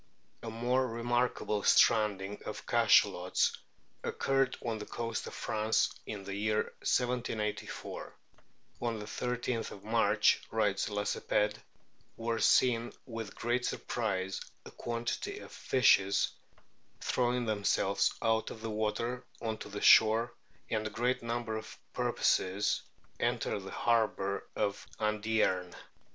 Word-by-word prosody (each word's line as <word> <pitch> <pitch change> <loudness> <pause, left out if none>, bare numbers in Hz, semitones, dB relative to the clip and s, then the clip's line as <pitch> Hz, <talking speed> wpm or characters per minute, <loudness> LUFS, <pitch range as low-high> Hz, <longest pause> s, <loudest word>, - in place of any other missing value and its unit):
A 115 - -5
more 125 +3 +1
remarkable 120 -2 0
stranding 105 -2 +3
of - - -6
Cachalots - - +4 0.5
occurred 135 -1 +1
on 115 -2 -2
the 105 - -6
coast 115 -1 -3
of - - -8
France 110 +1 +1 0.2
in 100 -2 -5
the 95 - -5
year 105 +2 0
1/84. 120 -4 -2 0.7
"On 115 -2 -1
the 105 - -6
i3th 120 -3 -3
March'," 105 -1 +3
writes 105 -3 +1
Lacepede, 105 0 0 0.6
"were 115 0 -1
seen 120 -2 +4
with 115 -5 -6
great 120 +1 0
surprise 95 -7 -2 0.2
a - - -10
quantity 120 - -3
of - - -10
fishes 100 -6 +3 0.7
throwing 125 0 0
themselves 100 -2 +1
out 110 -1 +2
of 110 - -9
the 115 -1 -4
water 110 +4 -2 0.2
on 110 -1 -3
to - - -8
the 105 0 -6
shore, 110 +2 +6 0.4
and 110 -1 0
a - - -4
great 120 +4 0
number 115 -1 -2
of 110 0 -7 0.2
porpoises 95 +3 +1 0.4
enter - - 0
the - - -8
harbour 110 -4 0
of 100 -1 -2
Andierne. 105 -4 0
110 Hz, 120 wpm, -32 LUFS, 105-120 Hz, 0.7 s, shore